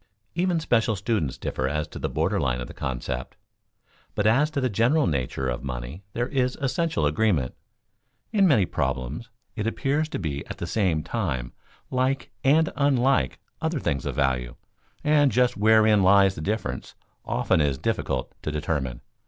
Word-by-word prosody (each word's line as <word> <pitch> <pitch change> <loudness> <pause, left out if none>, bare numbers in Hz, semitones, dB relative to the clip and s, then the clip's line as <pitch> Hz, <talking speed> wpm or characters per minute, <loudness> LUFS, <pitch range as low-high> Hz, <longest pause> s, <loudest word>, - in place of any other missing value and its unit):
Even 175 0 +1
special 115 -7 +2
students 95 - -1
differ 65 - -2
as 75 +1 -2
to - - -8
the - - -2
border - - 0
line 60 0 0
of 60 - -5
the - - -10
concept, 65 -1 -4 0.8
but 105 - 0
as 135 +8 +4
to 155 -3 -2
the 130 - +1
general 120 +8 +2
nature 65 -4 -1
of 60 +1 -3
money 65 +7 -6
there 120 +1 -1
is 130 -2 0
essential 135 - 0
agreement. 75 - +1 0.8
In 200 -3 +4
many 115 - +4
problems 70 - -3 0.3
it 110 -1 -2
appears 145 +6 0
to - - -3
be 75 -6 -3
at - - -7
the - - -4
same 85 -5 +1
time 70 - -3 0.4
like 130 +1 0
and 155 +4 +4
unlike 135 -2 +2 0.2
other 160 -1 0
things 70 - -1
of - - -3
value, 65 -3 0 0.5
and 150 -2 +4
just 125 0 +3
wherein 110 0 +5
lies 95 0 +5
the 75 - -7
difference 105 +7 -3 0.3
often 80 - +1
is 70 -2 +1
difficult - - -2
to - - -3
determine. 70 -5 -2
105 Hz, 165 wpm, -25 LUFS, -, 0.8 s, wherein